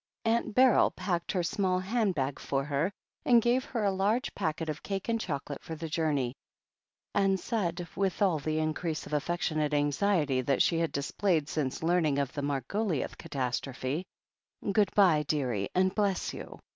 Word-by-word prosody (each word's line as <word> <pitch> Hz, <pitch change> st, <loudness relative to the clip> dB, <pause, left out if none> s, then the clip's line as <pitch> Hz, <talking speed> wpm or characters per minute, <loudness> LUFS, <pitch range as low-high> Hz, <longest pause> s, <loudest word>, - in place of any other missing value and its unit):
Aunt 230 Hz, -1 st, +1 dB
Beryl 255 Hz, -2 st, +6 dB
packed 175 Hz, -3 st, -2 dB
her 180 Hz, -3 st, +1 dB
small 185 Hz, +1 st, +1 dB
hand 200 Hz, +1 st, 0 dB
bag 135 Hz, -1 st, -1 dB
for 135 Hz, 0 st, -1 dB
her 150 Hz, +6 st, 0 dB, 0.3 s
and 240 Hz, -2 st, +6 dB
gave 240 Hz, +3 st, +2 dB
her 235 Hz, -6 st, -2 dB
a 200 Hz, -, +3 dB
large 210 Hz, +7 st, 0 dB
packet 160 Hz, +1 st, -2 dB
of 155 Hz, -1 st, -4 dB
cake 195 Hz, +2 st, -4 dB
and 230 Hz, -1 st, +1 dB
chocolate 145 Hz, -4 st, -4 dB
for 165 Hz, -, -6 dB
the 165 Hz, +1 st, -5 dB
journey, 150 Hz, -6 st, 0 dB, 0.8 s
and 195 Hz, -1 st, +2 dB
said, 175 Hz, -6 st, -2 dB
with 195 Hz, -1 st, 0 dB
all 185 Hz, -6 st, +3 dB
the 155 Hz, +2 st, -2 dB
increase 155 Hz, +1 st, -2 dB
of -, -, -8 dB
affectionate 155 Hz, -1 st, 0 dB
anxiety 145 Hz, -1 st, +2 dB
that 135 Hz, +1 st, +2 dB
she 165 Hz, -, +2 dB
had 165 Hz, -1 st, 0 dB
displayed 155 Hz, +2 st, 0 dB
since 150 Hz, -2 st, -2 dB
learning 165 Hz, -4 st, +2 dB
of 140 Hz, -2 st, -1 dB
the 145 Hz, -, -3 dB
Margoliouth 145 Hz, -, -1 dB
catastrophe: 130 Hz, +3 st, -3 dB, 0.7 s
"Good 205 Hz, -1 st, +3 dB
bye, 180 Hz, -7 st, +5 dB
dearie, 125 Hz, -10 st, 0 dB
and 185 Hz, 0 st, +3 dB
bless 200 Hz, -3 st, 0 dB
you. -, -, -8 dB
165 Hz, 170 wpm, -30 LUFS, 145-195 Hz, 0.8 s, Beryl